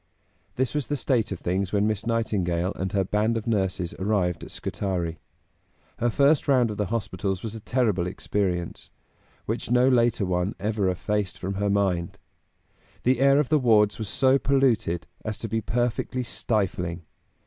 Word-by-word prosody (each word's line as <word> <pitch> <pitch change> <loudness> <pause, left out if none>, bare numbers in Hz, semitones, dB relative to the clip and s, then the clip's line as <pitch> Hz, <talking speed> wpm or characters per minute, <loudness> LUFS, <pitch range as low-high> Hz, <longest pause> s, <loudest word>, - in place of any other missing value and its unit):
This 130 -1 0
was 150 -3 -2
the 145 - -1
state 125 -6 0
of 95 - -4
things 95 +2 -1
when 105 0 +2
Miss 110 +1 -1
Nightingale 95 -6 0
and 95 0 -3
her 100 -1 +1
band 105 +4 +1
of 110 - -4
nurses 95 -6 -1
arrived 95 -4 0
at - - -8
Scutari. 85 -4 -3 0.8
Her 120 - +2
first 140 +5 +3
round 125 -5 +3
of 105 - -6
the 105 - -1
hospitals 95 -3 -2
was 110 -2 -4
a 115 - -7
terrible 105 -7 0
experience, 90 -2 -2 0.6
which - - -3
no 125 +1 +4
later 120 -4 +3
one 90 +2 -1
ever 105 -2 0
effaced 100 +2 -2
from 95 +2 -4
her 100 +1 -1
mind. 95 -4 0 0.9
The 130 0 +3
air 140 +1 +5
of 150 - 0
the 155 - +4
wards 110 -5 +3
was 110 -3 -4
so 135 +3 +3
polluted 120 - +1 0.2
as 110 -1 -4
to 115 - -5
be 115 0 -1
perfectly 120 +2 -1
stifling. 95 -7 -2
105 Hz, 170 wpm, -25 LUFS, 95-120 Hz, 0.9 s, air